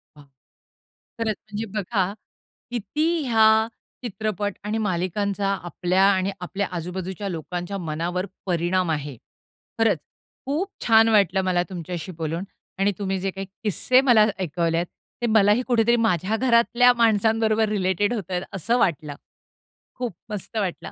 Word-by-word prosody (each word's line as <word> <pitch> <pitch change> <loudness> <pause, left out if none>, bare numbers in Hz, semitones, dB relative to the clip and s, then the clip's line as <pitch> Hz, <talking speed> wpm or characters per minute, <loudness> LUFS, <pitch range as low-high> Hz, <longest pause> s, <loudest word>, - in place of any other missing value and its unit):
Wow! 145 - -15 1.0
खरंच 220 -2 0
म्हणजे 215 +1 -6
बघा 195 -1 0 0.6
किती 245 +7 -1 0.2
ह्या 220 -1 +5 0.4
चित्रपट 210 -3 -2
आणि 210 +2 -2
मालिकांचा 200 0 -1 0.2
आपल्या 180 +2 +1
आणि 190 +1 0
आपल्या 195 +3 -3
आजूबाजूच्या 185 +3 -5
लोकांच्या 175 +3 -4
मनावर 175 +2 -2 0.2
परिणाम 175 0 +1
आहे. 145 -3 -3 0.6
खरंच, 220 -8 +3 0.5
खूप 315 +9 -1 0.2
छान 225 0 +6
वाटलं 195 -3 +3
मला 180 -1 +2
तुमच्याशी 175 0 -5
बोलून 165 +2 -3 0.4
आणि 195 +1 +3
तुम्ही 190 -1 -1
जे 195 +1 -2
काही 195 0 -6 0.2
किस्से 250 +5 +3
मला 240 -5 +5
ऐकवले 165 -1 0
आहेत 170 +1 -1 0.3
ते - - +1
मलाही 215 +1 +4
कुठेतरी 235 -1 +3
माझ्या 215 -2 +1
घरातल्या 245 0 +4
माणसांबरोबर 220 -1 +3
रिलेटेड 200 +1 +1
होत 195 -6 -5
आहेत 180 - 0
असं 210 +6 0
वाटलं. 150 -6 0 0.8
खूप 245 -4 -4 0.2
मस्त 210 +2 -5
वाटलं. 175 -5 -3
200 Hz, 130 wpm, -24 LUFS, 180-220 Hz, 1.0 s, छान